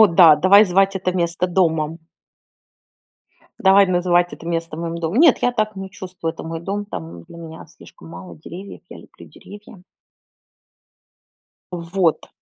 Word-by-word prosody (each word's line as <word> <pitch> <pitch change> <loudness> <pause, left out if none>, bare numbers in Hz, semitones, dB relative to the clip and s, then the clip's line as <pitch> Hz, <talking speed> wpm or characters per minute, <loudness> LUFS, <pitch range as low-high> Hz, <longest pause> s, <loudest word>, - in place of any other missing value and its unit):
О 220 - +9
да, 165 -3 +6
давай 200 +3 +6
звать 195 +1 +1
это 185 -1 -2
место 175 0 -2
домом. 165 -3 0 1.6
Давай 195 +1 +5
называть 175 -1 +1
это 165 - -11
место 165 -2 -4
моим 170 0 -5
домом. 170 +8 -2
Нет, 320 -5 +5
я 245 - +2
так 215 -3 -2
не 195 0 -8
чувствую. 180 -3 -6
Это - - -10
мой 165 0 -6
дом. 200 +3 -4
Там 85 - -9
для 170 - -15
меня 165 -1 -11
слишком 80 - -17
мало 85 0 -11
деревьев, 185 - -11
я - - -11
люблю - - -16
деревья. 205 -2 -15 1.9
Вот. 170 -1 -1
175 Hz, 150 wpm, -20 LUFS, 165-195 Hz, 1.9 s, О